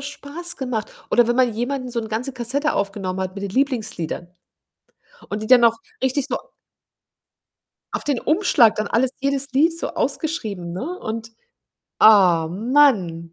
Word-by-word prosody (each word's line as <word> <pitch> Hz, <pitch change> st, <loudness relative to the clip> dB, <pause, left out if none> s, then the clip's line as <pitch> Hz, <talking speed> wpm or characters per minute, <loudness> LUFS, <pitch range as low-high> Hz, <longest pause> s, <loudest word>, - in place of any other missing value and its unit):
Spaß 290 Hz, +4 st, -4 dB
gemacht 245 Hz, -5 st, -5 dB
oder 240 Hz, -1 st, +4 dB
wenn 240 Hz, -, +1 dB
man 255 Hz, -2 st, +3 dB
jemandem 255 Hz, +3 st, -3 dB
'n -, -, -8 dB
so 235 Hz, -1 st, -2 dB
'n 220 Hz, -, -7 dB
ganze 235 Hz, +5 st, -3 dB
Kassette 260 Hz, +5 st, -1 dB
aufgenommen 195 Hz, -2 st, -3 dB
hat 185 Hz, 0 st, -4 dB
mit 200 Hz, -, -7 dB
den 200 Hz, -, -4 dB
Lieblingsliedern 220 Hz, -, -2 dB, 1.0 s
und 210 Hz, +1 st, -4 dB
die 215 Hz, -, -5 dB
dann 250 Hz, 0 st, +6 dB
auch 230 Hz, 0 st, +3 dB, 0.2 s
richtig 260 Hz, +1 st, 0 dB
so 260 Hz, -, -1 dB, 1.6 s
auf -, -, -3 dB
den 285 Hz, -5 st, 0 dB
Umschlag 310 Hz, -, +4 dB
dann 215 Hz, -1 st, -2 dB
alles 250 Hz, +4 st, +1 dB
jedes 275 Hz, 0 st, -1 dB
Lied 320 Hz, +6 st, +2 dB
so -, -, -3 dB
ausgeschrieben, 215 Hz, -, -3 dB
ne? 275 Hz, -, -5 dB
Und, 225 Hz, +1 st, -5 dB, 0.7 s
ah 180 Hz, -7 st, +6 dB
Mann. 190 Hz, -, +2 dB
240 Hz, 160 wpm, -21 LUFS, 205-275 Hz, 1.6 s, dann